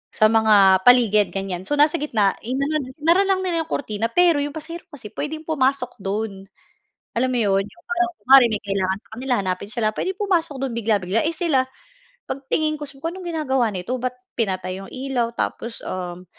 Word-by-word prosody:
Sa 215 0 +4
mga 205 -4 +6
paligid 220 -5 +6
ganiyan, 190 -1 -4
so 290 - +1
nasa 300 +3 +3
gitna. 215 -9 +2
In-ano, 275 +6 -1 0.2
hinarang 340 +6 +3
lang 380 -1 +2
nila 335 -3 0
yung 320 - -20
kurtina 220 -4 -1
pero 340 +3 +3
yung 290 +1 -3
pasahero 335 +3 -7
kasi 265 - -10
pwedeng 310 +2 -5
pumasok 270 -6 0
do'n. 195 0 -4 0.7
Alam 255 +2 +1
mo 250 - 0
‘yon, 195 -3 +2
yung 345 - -15
parang 355 0 0
kuwari 265 -1 +7
may 215 - -1
kailangan 195 -1 -1
sa - - -27
kanila 255 +3 -3
hanapin 190 +1 -3
sila, 215 -1 -1
puwedeng 375 - -3
pumasok 345 -7 0
dun 265 -3 -3
bigla-bigla, 215 -2 +1
eh, 320 - +1
sila 315 -5 +2 0.6
'pag 275 - -4
tingin 310 -1 +1
ko 295 - -5
so 275 0 -12
anong 365 +3 -5
ginagawa 270 -9 0
nito 195 +5 -4
ba't 250 0 -2 0.2
pinatay 185 -4 -2
'yong 195 - -10
ilaw 255 -3 -2
tapos, 230 0 -3
uhm, 180 -1 -5
250 Hz, 185 wpm, -22 LUFS, 205-310 Hz, 0.7 s, kuwari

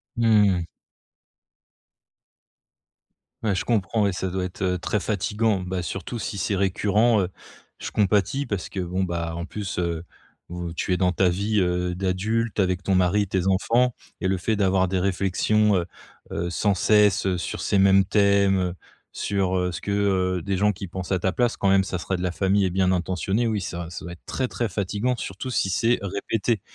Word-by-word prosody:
Mmh. 105 -7 +3 2.8
Ouais, 105 -3 +1
je 100 - -2
comprends 110 -1 +1
ouais, 100 - +1
ça 95 0 -2
doit 95 0 -2
être, 90 +1 -6
heu, 90 -1 0
très 105 - -1
fatiguant. 105 +1 0
Bah, 90 -1 -3
surtout 95 +8 -5
si 100 -2 -4
c'est 100 +2 0
récurrent, 105 +3 +2
heu, 90 - 0 0.5
je - - -5
compatis 105 +7 +1
parce 100 -3 -3
que 95 - -6
bon, 90 +1 -1
bah, 85 -2 -3
en 85 +1 -4
plus, 100 -2 -5
heu, 85 -2 -1 0.5
vous 85 -1 -5
tu 90 - -3
es 90 - +3
dans 90 -1 +2
ta 95 0 +2
vie, 100 +4 0
heu, 90 0 0
d'adulte 105 +5 -1
avec 95 -1 +1
ton 95 -1 +1
mari, 95 +3 +2
tes 95 -1 -1
enfants 115 +6 +2 0.3
et 95 - +1
le 95 0 +1
fait 110 +5 0
d'avoir 95 -2 +2
des 95 0 0
réflexions, 100 +3 +2
heu, 90 -2 +1 0.5
heu, 85 +1 -2
sans 100 +3 +1
cesse, 105 0 +3
heu, 90 -1 +1
sur 85 - -4
ces 100 - +1
mêmes 95 0 +5
thèmes. 100 -3 +3 0.4
Sur, 95 -2 0
heu, 90 0 0
ce - - -6
que, - - -6 0.5
heu - - -4
des 100 -2 -1
gens 105 +2 +3
qui 100 -1 -7
pensent 95 +1 -6
à 95 - +3
ta 95 +1 0
place 120 -2 0
quand 100 - +1
même 95 0 +4
ça 95 - -3
serait 90 +2 -2
de - - -5
la 90 -1 -1
famille 95 +1 +2
et - - +1
bien 95 +1 +2
intentionné, 95 +5 0
oui, 110 -3 -1
ça 85 -1 -5
ça 90 - -8
doit 85 - -6
être 85 - -13
très, 130 - -1
très 120 -2 -2
fatiguant 105 +6 -1
surtout 95 +7 -5
si 95 -6 0
c'est 115 +5 +2
répété. 100 +3 -1
95 Hz, 195 wpm, -24 LUFS, 90-105 Hz, 2.8 s, mêmes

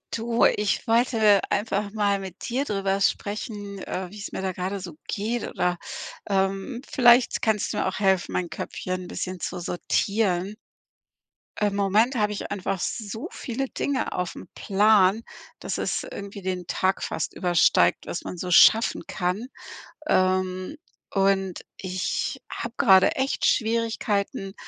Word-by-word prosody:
Du, 230 +1 +2
ich 210 -1 +1
wollte 225 -3 +4
einfach 205 -1 -1
mal 205 -2 +1
mit 190 -2 -8
dir 260 +4 -1
drüber 195 -3 -1
sprechen, 205 0 -2
äh, 185 -1 -5
wie 210 - -10
es 205 - -6
mir - - -4
da 190 - 0
gerade 185 +2 -3
so 180 -3 -8
geht 225 +3 -2
oder, 180 -1 -1 0.5
ähm, 195 +5 0
vielleicht 245 -1 +5
kannst 215 -2 0
du - - -3
mir - - +1
auch 190 - -3
helfen 190 -3 +1
mein 180 -2 -1
Köpfchen 185 0 -4
bisschen 185 0 -5
zu 175 - -4
sortieren. 190 +2 0 1.1
Im 205 -1 +1
Moment 210 +6 +2
habe 210 -3 +1
ich 205 - -5
einfach 195 -1 -2
so 220 - -4
viele 265 +2 -4
Dinge 280 -2 -2
aufm 180 -1 -4
Plan, 205 0 +4 0.4
dass - - -4
es - - -1
irgendwie 200 0 -8
den 185 -2 -3
Tag 190 +2 0
fast - - -3
übersteigt, 170 - +3
was - - -4
man 180 - -6
so 180 +1 -4
schaffen 225 +6 +6
kann, 185 +7 -2 0.6
ähm, 185 +5 +1 0.3
und 195 -1 +1 0.2
ich 185 -1 -3
habe 235 0 -5
gerade 190 -1 +6
echt 265 +1 0
Schwierigkeiten, 220 -3 0
200 Hz, 145 wpm, -25 LUFS, 185-220 Hz, 1.1 s, schaffen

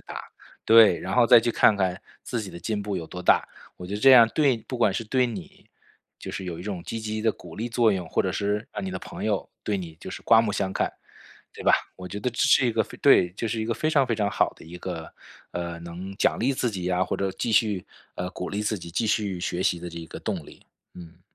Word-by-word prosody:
打， - - -8 0.4
对。 110 -5 +7
然 95 - -4
后 125 -2 +5
再 - - +9
去 120 +1 0
看 105 - +5
看 95 -2 -1 0.2
自 120 - -3
己 100 - -6
的 85 - -9
进 105 0 -3
步 100 -2 -3
有 80 -2 -5
多 90 - -8
大， - - +4 0.3
我 90 - -8
觉 95 - -7
得 105 - -4
这 135 - +7
样 120 -2 +9
对 140 -6 +3
不 125 +3 -7
管 105 -4 +3
是 115 - -2
对， 125 +3 +2
你 105 -7 -9 0.5
就 - - -7
是 95 - -5
有 85 -2 -5
一 - - -7
种 95 -4 -5
积 115 - -4
极 110 0 -3
的 110 - +2
鼓 85 -2 -13
励 115 +6 -4
作 115 -1 +3
用， 90 -4 -3
或 - - +1
者 95 - -1
是 105 +2 -1
让 100 - -5
你 95 - -3
的 95 - -4
朋 - - -8
友 - - -1
对 105 - -1
你 85 -4 -7
就 - - -8
是 - - -8
刮 115 -1 +6
目 110 -2 -1
相 95 -1 -1
看， - - 0 0.6
对 - - -10
吧。 - - +6 0.2
我 90 - -8
觉 100 +3 -6
得 125 - -1
这 120 - -5
是 135 -1 +5
一 115 - 0
个 - - +2
非 - - -12
对， 90 - +5
就 110 +4 -4
是 110 -1 -2
一 - - -1
个 115 - -1
非 155 - -1
常 140 -4 +3
非 115 - 0
常 105 -2 0
好 - - +2
的 - - -14
一 85 +2 -10
个， 85 -3 -6 0.4
呃， 85 -1 -4
能 85 +3 -8
奖 - - +2
励 130 +4 +2
自 125 -2 0
己 90 -3 -4
啊， 90 +1 +2
或 - - -3
者 100 -1 -1
继 - - -3
续， 105 -3 +2 0.3
呃， 90 0 -3
鼓 90 - -5
励 105 +1 -2
自 105 0 -1
己 85 -1 -9
继 110 +5 0
续 100 -4 0
学 90 0 -2
习 90 -2 +1
的 90 0 -6
这 85 -1 -8
个 - - -9
动 - - -4
力。 - - -16 0.3
嗯。 85 0 -12
100 Hz, 290 characters per minute, -25 LUFS, 90-115 Hz, 0.6 s, 再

